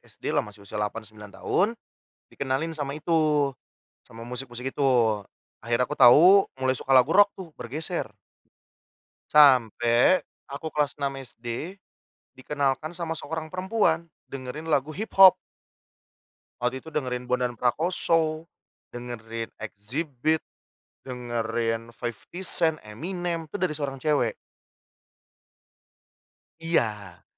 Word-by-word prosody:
masih - - -21
SD - - -25
lah - - +3
masih 105 -1 -11
usia 105 +1 -5
8, 105 +2 -3
9 105 -1 -13
tahun, 200 - +1 0.6
dikenalin 140 +4 -2
sama 140 -1 -3
itu, 155 -2 +2 0.6
sama 115 - -12
musik-musik 125 +1 -5
itu. 140 +1 -1 0.8
Akhirnya, 120 +2 +1
aku 150 - -4
tahu 165 +11 +8 0.2
mulai 130 0 +1
suka 135 - 0
lagu 130 +3 +6
rock 200 0 +6
tuh, 185 -4 -9
bergeser. 145 +7 -4 1.2
Sampai 125 - +5 0.2
aku 145 +3 -6
kelas 150 -1 0
6 140 -1 -3
SD, 125 - -7 0.6
dikenalkan 140 +4 -2
sama 170 -2 -4
seorang 160 -1 -5
perempuan, 185 -3 0 0.2
dengerin 140 +4 -6
lagu 150 +1 +1
hip 220 +4 -5
hop. 190 -1 +10 1.3
Waktu 125 +2 -1
itu - - -11
dengerin 125 -5 -3
Bondan 125 -1 0
Prakoso, 160 +5 0 0.4
dengerin 115 -2 -7
Xzibit, 130 +8 -2 0.6
dengerin 115 -2 -3
50 115 - -30 0.5
Cent, 160 -2 +2
Eminem, 170 - -4
itu 205 - -4
dari 180 -5 0
seorang 140 -2 -4
cewek. 150 - +1 2.3
Iya. 105 - -2
140 Hz, 115 wpm, -26 LUFS, 120-160 Hz, 2.3 s, hop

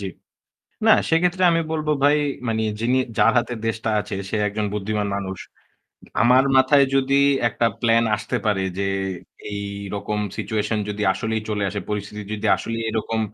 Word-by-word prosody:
জ্বি। 100 - -4 0.8
না - - +8 0.2
সেক্ষেত্রে 175 +3 +2
আমি 165 0 +2
বলবো 155 -1 -1
ভাই 145 +1 +5 0.3
মানে 110 -1 0 0.2
যিনি 120 +3 +2 0.2
যার - - +5
হাতে 120 +1 -2
দেশটা 115 0 -2
আছে 105 - -6 0.2
সে - - -1
একজন 105 +1 -2
বুদ্ধিমান 105 0 -2
মানুষ। 95 -2 -5 0.8
আমার 125 +3 +5
মাথায় 130 +2 +6
যদি 135 0 +2 0.3
একটা 115 +1 -1 0.2
প্ল্যান 115 -1 +4
আসতে 105 - -3
পারে 100 -3 +1
যে 100 - -1 0.7
এইরকম 100 +1 -4 0.2
সিচুয়েশন 110 -1 -1
যদি 105 0 -4
আসলেই 110 +3 -2
চলে 105 -1 -1
আসে 100 +1 -4
পরিস্থিতি 105 0 -4
যদি 105 - -4
আসলেই 115 0 -4
এরকম 110 0 -2
110 Hz, 155 wpm, -22 LUFS, 105-125 Hz, 0.8 s, না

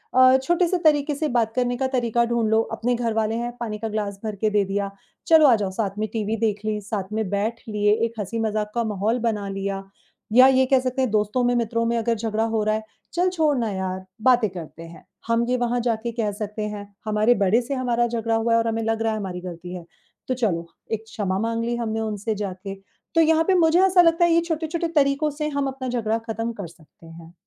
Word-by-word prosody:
अ, 255 0 +7
छोटे-से 345 +4 +2
तरीक़े 295 -1 +3
से 310 +2 -1
बात 225 -2 +2
करने 245 -1 +1
का 265 +1 0
तरीक़ा 235 -2 +2
ढूँढ़ 235 -2 0
लो, 220 0 +4
अपने 245 +2 -1
घर 235 -1 -1
वाले 220 0 0
हैं, 240 +1 -2
पानी 220 -3 -4
का 225 - -3
ग्लास 205 -2 -3
भर 215 -2 -3
के 215 - +3
दे 205 -1 +2
दिया। 200 +1 -2 0.4
चलो 320 -2 +7
आ 250 - +6
जाओ 205 -3 -2
साथ 200 0 -3
में 215 - 0
टीवी 220 -1 -1
देख 215 -2 0
ली, 215 -1 -1
साथ 205 0 -3
में 220 -3 -1
बैठ 215 +4 -2
लिए, 210 -1 +2
एक 230 -1 -6
हँसी-मज़ाक 215 0 -2
का 235 - +1
माहौल 215 +2 -1
बना 220 -4 -1
लिया, 195 0 -3 0.5
या 255 +2 +8
ये 260 0 +4
कह 265 0 +4
सकते 255 +1 -2
हैं 260 - +1
दोस्तों 215 +3 +1
में 245 0 +2
मित्रों 230 -1 0
में 235 0 +1
अगर 230 0 0
झगड़ा 220 0 -1
हो 225 -1 0
रहा 215 0 +1
है, 220 - -3 0.3
चल 360 +1 +2
छोड़ 315 -6 +1
ना 230 -3 0
यार, 190 -1 -4 0.2
बातें 245 -2 +4
करते 165 -2 -9
हैं। 165 -1 -13 0.2
हम 230 0 +2
ये 250 - +2
वहाँ 245 0 0
जाके 230 +1 -2
कह 210 -2 0
सकते 210 +1 -3
हैं, 205 0 -8 0.2
हमारे 215 +3 +3
बड़े 220 +6 +3
से 250 +4 -4
हमारा 240 -2 +1
झगड़ा 230 -1 -1
हुआ 230 +1 +2
और 230 0 +1
हमें 225 0 -1
लग 225 0 -1
रहा 225 0 +1
है - - -2
हमारी 185 -3 -5
गलती 175 0 -8
है, 175 -2 -8 0.4
तो 255 - 0
चलो 190 -9 -1 0.2
एक 220 0 -2
क्षमा 200 -4 -2
माँग 230 +1 -1
ली 240 0 -1
हमने 225 -2 -2
उनसे 215 0 -2
जाके, 195 -1 -5 0.4
तो 330 - +6
यहाँ 320 0 +4
पे 385 - +4
मुझे 335 -1 +4
ऐसा 370 -1 +6
लगता 335 0 +4
है 345 - +2
ये 335 - +4
छोटे-छोटे 325 +1 -1
तरीक़ों 280 +1 +3
से 300 - +1
हम 280 -1 +1
अपना 265 -1 -5
झगड़ा 225 -2 0
ख़त्म 225 +1 -2
कर 200 -5 -7
सकते 165 0 -19
हैं। 165 +1 -13
225 Hz, 235 wpm, -23 LUFS, 210-250 Hz, 0.5 s, या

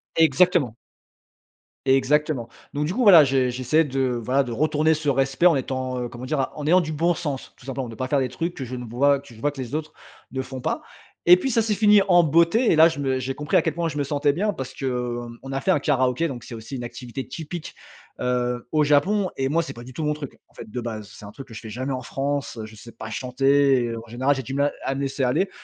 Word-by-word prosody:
Exactement. 160 - +3 1.1
Exactement. 135 -1 +2 0.2
Donc, 150 +1 -1
du 175 - -2
coup, 250 - +1
voilà 180 -7 +9
je 130 -2 +2
j'essaie 130 +6 +2
de 135 -3 -1
voilà, 130 +5 +2
de 120 - -6
retourner 155 +4 +2
ce 155 -1 -5
respect 135 +3 +1
en 175 -3 +7
étant, 130 -1 -2
heu, 120 - -4
comment 120 +2 -8
dire, 150 +2 -1
a 135 - -1
en 150 - -5
ayant 180 +4 +5
du 155 - -4
bon 170 +3 +1
sens 145 -6 -5
tout - - -18
simplement. 135 -2 -4
De 115 - -9
pas 130 +3 -3
faire 140 +1 +2
de 130 - +1
trucs 165 +7 -4
que 130 - -5
je 125 +1 -6
ne 125 - -6
vois 140 +5 +2
que 135 -4 -15
je - - -15
vois 145 +5 0
que 140 -2 -7
les 125 +2 -5
autres 155 0 -4 0.4
ne 130 0 -2
font 130 0 -7
pas. - - -2 0.5
Et 180 - +9
puis, 265 +9 -2
ça 230 - +3
s'est 215 -1 0
fini 210 0 +6
en 175 -2 +6
beauté 170 - +3
et - - +4
là, 160 +1 +8
je 160 - -6
me 130 -2 0
j'ai 130 +1 -3
compris 150 0 -2
à - - +5
quel - - -2
point 170 0 -1
je 150 -2 -5
me - - +1
sentais 145 0 +1
bien, 210 +6 0
parce 130 -6 -6
que, 135 - -6
hem, 120 -2 -3
on 135 - -7
a 135 0 -2
fait - - -2
un - - +3
karaoké, 130 +2 +1
donc, 125 -5 -7
c'est - - -10
aussi 115 +5 -8
une 120 - -5
activité 120 +2 -7
typique, 165 +1 -7 0.4
heu, 125 -1 -1
au 155 -1 +3
Japon. 185 +7 +2
Et 135 0 0
moi, 165 +4 +2
c'est 165 - -6
pas 120 - -10
du 130 - -11
tout 155 - -4
mon 150 0 +1
truc. 150 -3 -8
En - - -31
fait, - - -9
de 125 - -4
base, 110 -3 -6
c'est - - -11
un 100 - -9
truc 135 - -11
que 115 - -13
je 110 - -7
fais 110 - -9
jamais 130 +5 -3
en 130 - -3
France. 135 +2 -3
Je 110 0 -12
sais 115 +2 -12
pas 110 - -8
chanter 135 +2 +2
et 115 -1 -3
en 115 +1 -9
général, 130 +5 +1
j'ai 135 - -3
du 135 +3 -5
mal 145 +1 +1
à 135 - -1
me 140 - -3
laisser 135 0 -2
aller. 130 +10 +1
135 Hz, 275 wpm, -24 LUFS, 125-155 Hz, 1.1 s, voilà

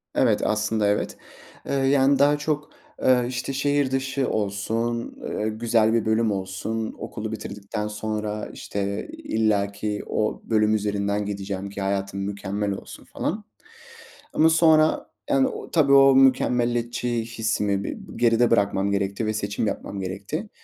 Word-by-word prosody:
Evet. - - +3
Aslında, 105 0 +1
evet. 105 0 0 0.5
Iıı, 135 -1 0
yani, 135 0 +4
daha 145 +1 +5
çok, 150 0 -2 0.3
ııı, 125 -1 +4
işte 125 +2 -3
şehir 145 0 +1
dışı 135 0 -1
olsun, 115 +3 -2
ııı, 105 - -2
güzel 115 -1 +3
bir 115 -2 +1
bölüm 110 0 +2
olsun, 100 +4 -3
okulu 110 0 -5
bitirdikten 105 0 -5
sonra 105 0 -3
işte 100 0 -4
illaki 105 -1 -1
o 110 - -1
bölüm 110 -1 +3
üzerinden 100 0 -1
gideceğim 100 -1 -4
ki 100 0 -6
hayatım 100 0 -2
mükemmel 100 +1 -2
olsun 100 - -8
falan. - - -4 0.9
Ama 160 - +5
sonra, 160 -1 +4 0.2
yani, 135 -1 +4
o - - -7
tabii 145 -4 +4
o 135 -1 +7
mükemmeliyetçi 120 -2 +2
hissimi 110 -3 -1
bi - - -4 0.2
geride 120 0 +3
bırakmam 100 -2 +2
gerekti 100 +2 -1
ve 110 - 0
seçim 105 0 -2
yapmam 100 - -4
gerekti. 100 - -4
110 Hz, 135 wpm, -24 LUFS, 100-125 Hz, 0.9 s, o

